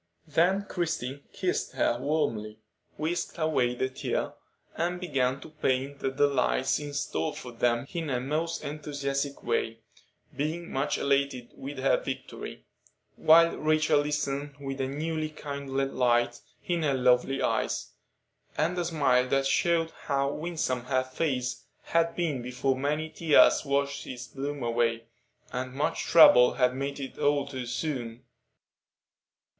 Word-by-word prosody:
Then 175 +6 +2
Christie 145 -5 -3
kissed 185 -2 -2
her 120 - +1
warmly, 115 -8 -1 0.4
whisked 165 +4 -2
away 135 -7 +1
the 130 - 0
tear, 130 0 -3 0.4
and 175 +2 -1
began 135 -7 0
to - - -10
paint 140 -2 -1
the 135 - 0
delights 135 -1 +2
in 145 -1 -6
store 80 - -2
for 125 - -8
them 120 +1 +1
in 165 -3 -3
her 125 -2 0
most 155 +6 -2
enthusiastic 140 -1 -3
way, 115 0 -1 0.5
being 160 +4 -3
much 135 +2 0
elated 140 -3 0
with 140 +1 -7
her 135 +1 +3
victory; - - -7 0.5
while 165 +1 +6
Rachel 155 -1 +3
listened 145 -1 -2
with 135 -1 -4
a 130 - 0
newly 155 +3 -2
kindled 140 -2 -3
light 120 -1 +2 0.2
in 175 -2 0
her 145 -3 +1
lovely 125 +1 +3
eyes, - - -1 0.7
and 165 +4 +1
a 175 - 0
smile 135 -6 +2
that 135 +1 +1
showed 165 +4 +2
how 140 0 +1
winsome 150 -7 -2
her 130 0 +1
face 130 -1 -2 0.2
had 165 0 +1
been 155 -7 -1
before 125 +2 -1
many 150 +4 -1
tears 160 -3 +5
washed 140 0 -1
its 125 -1 -6
bloom 140 0 -5
away, 115 -1 +1 0.5
and 130 +1 -3
much 150 +3 -1
trouble 125 -7 +7 0.2
made 140 +2 -3
it 135 -1 -7
old 145 -1 +1
too 130 -2 -5
soon. 120 -3 -3
140 Hz, 140 wpm, -28 LUFS, 130-155 Hz, 0.7 s, trouble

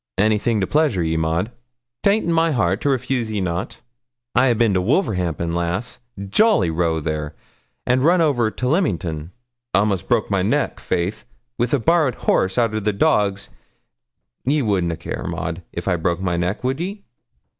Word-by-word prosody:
'Anything 110 +2 +2
to 95 - +1
pleasure 145 - +1
ye, 80 0 0
Maud, 80 +7 0 0.5
'tain't 205 +2 +2
in 170 - +1
my 165 0 +3
heart 105 - +1
to 145 - +1
refuse 130 -3 -1
ye 105 -1 -2
nout. 90 +3 -3 0.5
I 130 - +4
a'bin 115 -3 +3
to 90 - +2
Wolverhampton, 90 - 0
lass 85 +8 -2 0.3
jolly 100 - +3
row 80 -1 0
there 75 -1 -3 0.5
and 130 +1 +2
run 175 +4 +4
over 135 -9 +2
to 125 +3 -3
Leamington; 90 - -1 0.5
a'most 100 -2 +1
broke - - +1
my - - +2
neck, - - 0
faith, 90 +4 -2 0.3
wi' 120 - +2
a 145 - +4
borrowed 150 0 +2
horse 95 +3 +1
arter 115 -3 +1
the 105 0 0
dogs; 100 0 +1 0.9
ye 145 +2 +1
would 100 -5 +1
na 85 -1 -1
care, - - -6
Maud, 85 +1 -4
if 85 - -6
I 90 -2 +2
broke 85 +1 -1
my 90 -2 -1
neck, 90 +6 -2
would 130 +3 -1
ye? 195 +4 -5
105 Hz, 170 wpm, -21 LUFS, 85-130 Hz, 0.9 s, I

